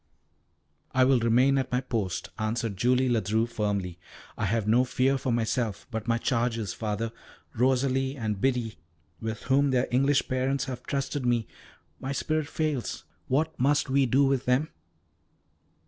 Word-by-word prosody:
"I 130 - +5
will 130 -1 +4
remain 125 +4 +3
at 130 0 -3
my 125 - +2
post," 105 -8 -3
answered 110 -1 -1
Julie 125 +6 +2
Ledru 110 -1 +1
firmly. 100 -6 -2 0.4
"I 105 - -2
have 105 +1 0
no 120 +4 +4
fear 130 +1 +1
for 130 -1 -2
myself, 115 -2 -1
but 110 0 -4
my 115 0 +2
charges, 115 -4 -1
Father 110 +1 -3 0.4
Rosalie 130 +2 +1
and 105 -5 -3
Biddy, 125 -4 0 0.4
with 110 0 -4
whom 140 +3 +3
their 130 -1 +1
English 135 +3 +2
parents 130 +1 0
have 130 -2 -5
trusted 140 0 -2
me. 120 -2 +1 0.5
My 135 +1 -3
spirit 155 +2 -1
fails! 155 -6 -2 0.2
What 155 +5 +1
must 140 +1 +2
we 135 -1 +3
do 135 +4 +4
with 135 -1 +1
them?" 125 +5 +2
125 Hz, 150 wpm, -27 LUFS, 115-135 Hz, 0.5 s, I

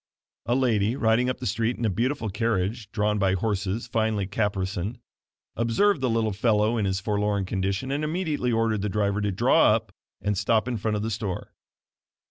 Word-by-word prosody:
A 120 - +2
lady 115 -4 +2
riding 115 0 +2
up 130 - -2
the - - -7
street 115 +3 0
in 115 - -2
a - - +3
beautiful 115 +1 -1
carriage, 105 0 -1
drawn 105 -1 0
by 95 -2 +2
horses 100 +2 -1
finely 110 -3 0
caparisoned, 100 +1 -2 0.6
observed 135 - +2
the 130 - +1
little 115 -2 +1
fellow 110 +1 +2
in 110 -3 0
his 95 0 0
forlorn 105 0 0
condition 95 +7 -2
and 145 +2 -1
immediately 155 -6 -1
ordered 115 -2 +1
the 105 - -1
driver 100 +1 0
to 105 - 0
draw 90 - +4
up - - -5 0.3
and 105 -2 -1
stop 110 +2 +2
in 125 -2 -1
front 105 0 -1
of 105 - -3
the 115 - -2
store. 100 -3 -4
110 Hz, 185 wpm, -26 LUFS, 100-115 Hz, 0.6 s, draw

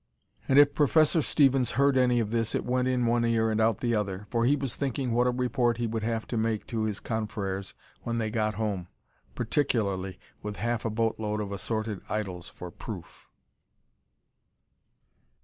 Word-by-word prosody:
And 135 - +3
if 145 0 +7
Professor 155 +3 +4
Stevens 135 -4 +3
heard 140 +2 +3
any 125 -2 +4
of 110 -2 -1
this, 115 -1 0
it - - -1
went 125 0 +1
in 125 -1 +1
one 120 0 +2
ear 115 -1 +2
and 110 0 +1
out 110 -2 +2
the 120 -1 +1
other, 100 -2 -2
for 115 -1 +2
he 140 +4 +4
was 135 -3 -3
thinking 135 -2 -2
what 120 +2 +3
a - - +4
report 125 -1 +1
he 120 - -1
would 115 0 -2
have 115 0 -2
to 120 - -2
make 110 -1 0
to 110 -1 0
his 105 -2 -2
confrères 100 -3 -3 0.3
when 115 0 -2
they 110 -2 -1
got 110 -2 0
home 100 -4 -2 0.5
particularly 100 -9 0 0.2
with 105 0 -5
half 120 +1 -2
a - - +1
boatload 110 -1 -1
of 100 -1 -4
assorted 110 +1 -3
idols 95 -5 -3
for 90 -1 -9
proof. 90 -2 -9
115 Hz, 180 wpm, -28 LUFS, 105-125 Hz, 0.5 s, if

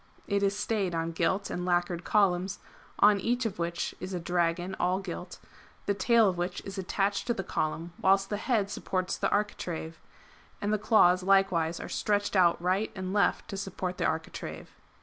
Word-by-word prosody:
[It 200 0 +1
is 200 0 +1
stayed 205 -5 -1
on 165 0 -1
gilt 190 +4 0
and 180 - -3
lackered 175 -1 0
columns, 190 -3 +2 0.4
on 205 -1 +5
each 245 +4 0
of 210 -6 -3
which 170 0 -2
is 185 +1 -5
a - - -2
dragon 175 +2 0
all 180 +1 +2
gilt, 180 -2 -6 0.5
the 200 - +1
tail 230 +2 +4
of 180 -2 -1
which 180 +1 -2
is 195 0 -6
attached 195 +2 -1
to 240 - +1
the 195 - -3
column 165 +1 -3
whilst 195 +1 +3
the 205 - 0
head 210 -3 0
supports 185 -2 -2
the - - 0
architrave, 170 -6 -2 0.6
and 205 +1 -1
the 215 - +1
claws 185 -4 +5
likewise 185 -4 +2
are - - -6
stretched 205 -1 0
out 175 -3 +4
right 185 +5 0
and 190 -1 -4
left 205 - +2
to 195 - -4
support 190 -2 -4
the - - +1
architrave. 160 0 -5
190 Hz, 185 wpm, -29 LUFS, 175-200 Hz, 0.6 s, on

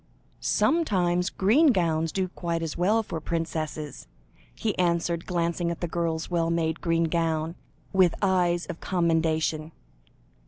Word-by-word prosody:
"Sometimes 180 - +1
green 235 +12 +4
gowns 165 - +2
do 190 -1 -1
quite 170 -2 -3
as 160 - -3
well 210 +6 +2
for 165 -6 -5
princesses," 155 - -4 0.5
he 215 -2 -1
answered, 170 -1 0
glancing 170 -1 0
at 170 - -4
the 175 - -2
girl's 165 -1 -2
well 170 -2 0
made 165 -1 0
green 165 -1 +1
gown, 165 -1 0 0.4
with 185 -3 +4
eyes 180 -3 +2
of 170 - -7
commendation. 160 -3 0
170 Hz, 130 wpm, -26 LUFS, 165-180 Hz, 0.5 s, green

